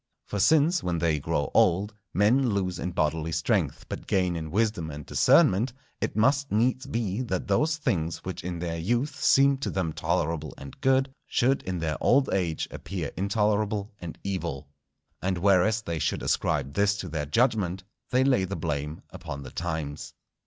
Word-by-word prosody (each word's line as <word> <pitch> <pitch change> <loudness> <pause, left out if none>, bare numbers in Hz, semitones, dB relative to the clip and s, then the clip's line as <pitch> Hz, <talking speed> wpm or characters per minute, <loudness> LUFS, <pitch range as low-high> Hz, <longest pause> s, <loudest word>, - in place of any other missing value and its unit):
For 105 - -4
since, 160 - +4
when 90 -1 -1
they 80 -2 +1
grow 75 0 -1
old, 100 +5 +3 0.2
men 120 +7 +3
lose 95 -4 -1
in - - -2
bodily 80 -1 -1
strength 80 0 0
but - - -7
gain 90 -2 +1
in 80 -1 -4
wisdom 105 -3 0
and 75 -1 -7
discernment, 115 +7 +4 0.3
it - - -2
must 135 +5 +2
needs 130 +5 +1
be 115 -3 -2
that 95 -8 -3
those 150 +11 +2
things 85 - -1
which 95 - -5
in 90 0 -4
their 85 -1 -3
youth 120 - 0
seemed 140 0 +4
to - - -1
them 85 -5 -2
tolerable 75 -2 -1
and 70 0 -11
good, 135 0 +2
should 135 +2 +2
in 90 -1 -3
their 80 -3 -2
old 135 +2 +3
age 85 -5 -1
appear 90 -7 -5
intolerable 105 +1 0
and 85 -2 -7
evil. 85 -8 -3 0.5
And 95 0 0
whereas 100 +4 +3
they 85 -4 -3
should - - -1
ascribe 70 -2 0
this 100 0 +2
to 95 - -5
their 75 -3 -3
judgment, 95 - +1 0.3
they 130 +1 +3
lay 130 -8 +3
the 95 +2 -4
blame 75 -1 -3
upon 70 0 -7
the 65 - -9
times. 80 -4 -4
95 Hz, 175 wpm, -27 LUFS, 80-115 Hz, 0.5 s, since